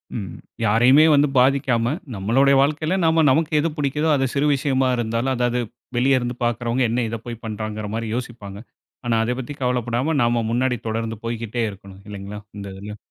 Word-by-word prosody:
ம். 100 -6 -5 0.3
யாரையுமே 125 +8 +5
வந்து 145 0 +4
பாதிக்காம, 125 -2 +2 0.2
நம்மோளட 120 +8 +3
வாழ்க்கையில, 155 +5 0
நாம 160 0 +4
நமக்கு 155 +4 +2
எது 165 +3 +1
பிடிக்கிதோ 150 +2 0
அது 135 -1 +1
சிறு 140 +1 +1
விஷயமா 135 -1 +1
இருந்தாலும், 115 +3 -1
அதாவது 120 0 0 0.4
வெளிய 130 +2 +3
இருந்து 120 0 -3
பாக்குறவங்க, 120 +2 0
என்ன 120 +2 0
இத 115 - -3
போய் 115 -1 -7
பண்றாங்கற 110 -1 -4
மாரி 115 -1 -3
யோசிப்பாங்க. 110 -5 -6 0.4
ஆனா, 120 -1 +1
அத 115 - -1
பத்தி 130 +3 -5
கவலப்படாம 125 +4 0
நாம 120 0 +2
முன்னாடி 125 +1 +1
தொடர்ந்து 115 0 -3
போய்க்கிட்டே 115 0 -3
இருக்கணும், 100 0 -13
இல்லைங்களா! 100 0 -7 0.2
இந்த 100 -1 -6
இதில? 105 +2 -8
120 Hz, 165 wpm, -22 LUFS, 110-135 Hz, 0.4 s, யாரையுமே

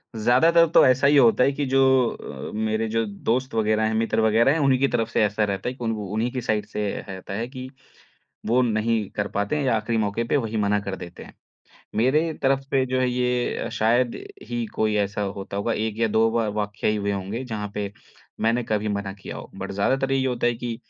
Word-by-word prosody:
ज़्यादातर 160 +10 +4
तो - - +7
ऐसा 130 +2 +4
ही 145 +1 +5
होता 125 -1 +5
है 135 - +3
कि 145 +1 -2
जो 135 0 +2 0.7
अ, - - -9
मेरे 110 +1 -1
जो 115 +1 0
दोस्त 115 +5 -2
वग़ैरह 110 0 +2
हैं, 110 0 +1
मित्र 115 0 0
वग़ैरह 110 +4 +4
हैं, 165 - 0
उन्हीं 135 -3 +3
की 140 - +3
तरफ़ 115 -3 -1
से 115 - +2
ऐसा 105 +1 0
रहता 100 0 -2
है - - -5
कि 125 - -8
उन 115 - 0
उन्हीं 110 +3 -2
की 125 - -3
साइड 105 -2 -1
से 105 -1 -3 0.2
रहता 95 0 -7
है 115 +4 -3
कि 130 0 -8 0.8
वो 120 +3 +3
नहीं 110 -2 0
कर 105 0 -1
पाते 100 +8 -1
हैं 145 - -1
या 125 -4 +2
आख़िरी 110 +2 -1
मौके 105 +2 -1
पे 115 - +1
वही 115 -5 -2
मना 105 -1 +2
कर 100 -1 -5
देते 85 -2 -10
हैं। - - -15 0.6
मेरे 150 +8 +2
तरफ़ 135 0 +3
से 135 -1 0
जो 130 0 -1
है 130 -1 +2
ये 125 -1 -1
शायद 120 +3 +1 0.3
ही 120 -1 -2
कोई 110 -1 +1
ऐसा 105 0 -1
होता 100 0 -4
होगा, 110 +3 0
1 110 0 -2
या 115 - +3
2 110 +1 +3
बार 115 -2 0
वाक़या 105 0 -2
ही 105 - +1
हुए 100 -1 -1
होंगे 100 +5 -4
जहाँ 105 -4 -4
पे 100 -1 -3 0.5
मैंने 115 +2 +2
कभी 110 -1 -1
मना 100 -1 -3
किया 100 - -9
हो। - - -9
बट 95 0 -6
ज़्यादातर 130 +7 0
ये 135 -1 +1
होता 120 -1 0
है 120 - 0
कि 120 0 -4
115 Hz, 230 wpm, -24 LUFS, 105-125 Hz, 0.8 s, तो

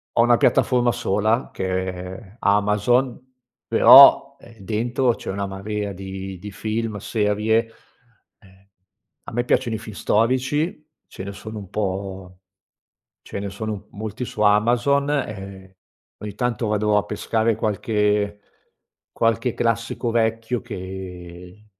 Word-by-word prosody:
ho - - +5
una 120 0 +5
piattaforma 125 -1 +3
sola 110 0 0
che - - -4 0.2
è 90 - -3 0.2
è 100 +1 -13
Amazon, 105 +5 +2 0.5
però, 140 +3 +8
ehm, 115 -1 -17
dentro 120 +5 0
c'è - - -6
una 100 0 -3
marea 100 +1 -4
di 95 0 -7
di 105 +3 -9
film, 110 +1 -3
serie 105 +2 0 0.7
e 95 0 -23 0.5
a - - -9
me 120 +1 0
piacciono 120 -2 +1
i 110 - -5
film 110 -2 -10
storici, 135 - 0 0.2
ce 95 - -9
ne 100 - -6
sono 110 +2 -9
un 100 -3 -9
po' 95 -2 -4 0.8
ce - - -7
ne 100 0 -4
sono 105 0 -5
molti 110 +4 -5
su 110 - -8
Amazon, 120 +7 +3
e 95 -8 -5 0.4
ogni 105 -1 -7
tanto 120 -2 -1
vado 105 0 +1
a 105 - -1
pescare 110 +1 0
qualche 105 -1 0 0.7
qualche 115 +1 0
classico 115 +1 -1
vecchio 115 +1 0
che 90 +1 -9
105 Hz, 130 wpm, -22 LUFS, 100-115 Hz, 0.8 s, però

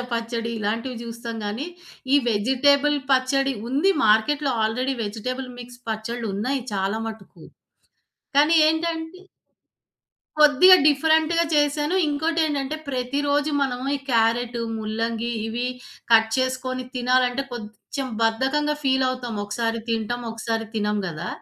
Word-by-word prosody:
టమాటా - - -2
పచ్చడి 230 0 -2
ఇలాంటివి 230 +4 -2
చూస్తాం 230 0 -6
గాని, 215 +9 -3 0.5
ఈ - - +8
వెజిటబుల్ 275 +7 +3
పచ్చడి 270 +1 +2 0.2
ఉంది 285 +10 +2 0.2
మార్కెట్‌లో 275 +7 +3
ఆల్రెడీ 255 +5 -1
వెజిటబుల్ 250 +5 -4
మిక్స్ 245 0 -11
పచ్చడ్లు 225 +2 -4
ఉన్నాయి 255 +6 -1
చాలా 195 +2 -1
మటుకు. 220 -3 -11 0.9
కానీ 300 +3 +5
ఏంటంటే 325 +2 -2 1.2
కొద్దిగా 305 +5 +8
డిఫరెంట్‌గా 320 +3 +3
చేశాను. 295 +2 +1
ఇంకోటేంటంటే 305 -1 0
ప్రతిరోజు 285 +3 0
మనము 255 -1 -2
ఈ - - -8
క్యారట్, 235 0 +1 0.2
ముల్లంగి 225 +2 -2 0.2
ఇవి 240 +2 -2 0.5
కట్ 225 0 +6
చేసుకొని 255 0 -2
తినాలంటే 250 +1 +2
కొంచెం 240 +4 -6 0.2
బద్ధకంగా 270 +7 +1
ఫీలవుతాం. 255 -3 0
ఒకసారి 225 +2 -2
తింటాం. 230 +1 -2
ఒకసారి 225 0 -3
తినం 210 -1 0
గదా! 170 +1 -5
255 Hz, 110 wpm, -23 LUFS, 225-285 Hz, 1.2 s, ఈ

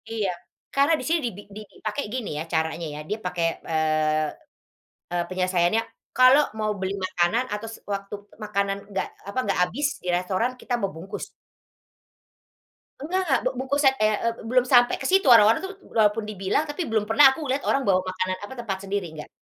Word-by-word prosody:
Iya. 215 -4 -1 0.5
Karena 280 +3 +4
di - - -6
sini 330 +1 +2
di - - 0 0.3
di 215 - -7
dipakai 220 +6 -4
gini 255 -4 -3
ya, - - -2
caranya 160 +1 -1
ya, - - -6
dia 210 - -1
pakai, 180 -2 -1 0.2
eee, 155 -1 +1 0.8
e - - -2
penyelesaiannya, 185 +2 +1 0.3
kalau 255 +4 +7 0.2
mau 215 0 0
beli 190 +1 -2
makanan 185 +7 +1
atau 210 +2 -4
s - - -9 0.2
waktu 200 0 -5 0.3
makanan 200 -1 -1
enggak 195 -1 -2 0.2
apa, 200 - -7
enggak 200 -5 -1
habis 230 +12 -2 0.2
di - - -8
restoran, 185 +7 -1
kita 250 - -4
mau 195 - -1
bungkus. 180 +5 -7 1.7
Nggak 350 +7 -1
nggak, 270 - +3
bu - - +3
bungkus 275 +3 0
at 265 - +4
ea 215 0 +4
eb 230 - -5
e - - -12
belum 250 0 +3
sampai 245 -1 +6
ke - - -4
situ, 385 -2 +4
orang-orang 225 -1 +7
tuh 385 - -6
u - - -17
walaupun 215 0 +3
dibilang, 195 +7 0
tapi 295 +5 -4
belum 220 -2 +1
pernah 270 +5 +7
aku 265 - -6
lihat 270 +2 0
orang 275 - +2
bawa 185 -1 +4
makanan 185 0 -2
apa, 205 - -7
tempat 210 -5 -3
sendiri, 195 -2 -2
enggak. 150 -1 -9
210 Hz, 190 wpm, -25 LUFS, 185-255 Hz, 1.7 s, kalau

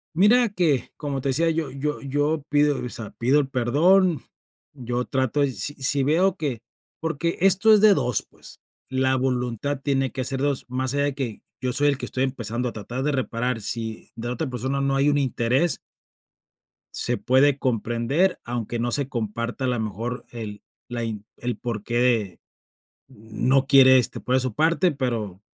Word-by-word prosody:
Mira 225 +6 +5
que, 165 - 0
como 140 -3 -3
te 135 - -1
decía, 165 +5 +2
yo 160 -4 -2
yo 145 +3 -3
yo 145 +2 -1
pido, 145 -1 +2
o - - -4
sea, 115 -3 -4
pido 130 +5 +2
el 140 - 0
perdón, 155 +6 +3 0.5
yo 125 -2 -3
trato 130 +1 -1
de 140 -2 +2
si-sí 135 +5 0
veo 175 +7 +2
que 140 - -3 0.4
porque 165 +1 -2
esto 195 +4 +5
es 210 - +6
de 210 -1 +7
2, 125 - +1
pues, - - -13 0.3
la 130 0 +1
voluntad 130 +1 -1
tiene 135 -2 0
que 130 -1 -3
ser 135 0 0
de 145 - +2
2, 140 - -3
más 130 +1 -2
allá 140 - +1
de 145 - -2
que 120 -7 -4 0.2
yo 125 - -1
soy 145 +3 +2
el 140 - +2
que - - -5
estoy 130 - -1
empezando 125 -1 -3
a - - -5
tratar 120 +5 -5
de 150 +1 0
reparar, 125 -2 -1
si 110 +1 -5
de 115 +1 -5
la 120 - -1
otra 150 +1 -3
persona 130 +3 -2
no 135 0 +1
hay 140 +1 +2
un 145 0 +3
interés 130 +4 +1 1.2
se - - 0
puede 135 +2 +3
comprender, 125 - 0
aunque 120 -1 -4
no 120 +1 -1
se 140 +1 +1
comparta, 115 0 -4
a - - 0
lo 125 -2 0
mejor 110 +3 -4
el 110 -3 -7 0.3
la 120 -1 -2
in 105 -2 -5
el 120 0 -3
porqué 120 -3 0 0.7
no 120 +5 0
quiere 130 -2 +7
este 125 - -1
poner 125 +2 +1
de - - +2
su 130 -3 -2
parte, 165 +3 +2
pero, 115 -9 -3
130 Hz, 185 wpm, -24 LUFS, 120-145 Hz, 1.2 s, de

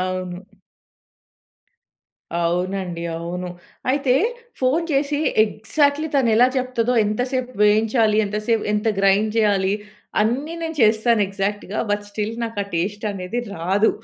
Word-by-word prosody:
అవును. 185 0 -3 2.0
అవునండి, 180 0 -1
అవును. 180 +2 -4 0.4
అయితే 270 -2 +2 0.5
ఫోన్ 280 +7 +2
చేసి 285 +1 +1 0.3
ఎగ్జాక్ట్లీ 285 +8 0
తను 265 -4 +3
ఎలా 245 +2 +7
చెప్తాదో 250 -1 0
ఎంతసేపు 250 +4 -2
వేయించాలి, 215 +1 +3
ఎంతసేపు 215 +2 -1
ఎంత 210 +1 +1
గ్రైండ్ 200 +2 +3
చేయాలి, 200 -3 +2 0.5
అన్నీ 260 +9 0
నేను 320 -1 -4
చేస్తాను 220 +1 +4
ఎగ్జాక్ట్‌గా 200 +1 -3
బట్ 205 0 0
స్టిల్ 215 +2 -3
నాకు 225 -2 -6
ఆ - - -15
టేస్ట్ 205 +6 -2
అనేది 190 +5 -4 0.2
రాదు. 190 +6 +2
215 Hz, 115 wpm, -22 LUFS, 195-250 Hz, 2.0 s, ఎలా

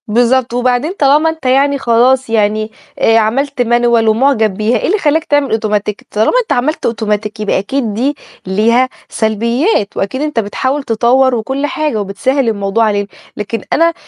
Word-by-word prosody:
بالضبط، 240 +2 +1
وبعدين 250 +6 0
طالما 295 +3 +3
أنت 320 -3 -7
يعني 275 +2 +2
خلاص 255 +1 +2
يعني 215 0 0 0.3
آآ، 225 - +4
عملت 260 +5 0
مانيوال 240 -1 +2
ومعجب 220 -2 +2
بيها، 215 +5 0
إيه - - -2
اللي 410 - +2
خلّاك 315 -1 +1
تعمل 290 -1 +1
أوتوماتيك؟ 210 -1 -2
طالما 215 +1 +1
أنت 455 - -2
عملت 280 +6 -1
أوتوماتيك 215 -1 -2
يبقى 210 -2 0
أكيد 225 +2 -2
دي 265 +7 -1 0.3
ليها 230 +6 +2 0.2
سلبيات، 230 - 0
وأكيد 200 +8 -2
أنت 300 -5 -1
بتحاول 260 +7 -2
تطوَّر 245 +3 +2
وكل 265 +5 -2
حاجة 295 -7 -2
وبتسهّل 240 +6 -1
الموضوع 200 +1 0
علينا، 205 -1 -1 0.3
لكن 210 +1 -4
أنا 335 +1 +3
235 Hz, 160 wpm, -14 LUFS, 215-275 Hz, 0.3 s, آآ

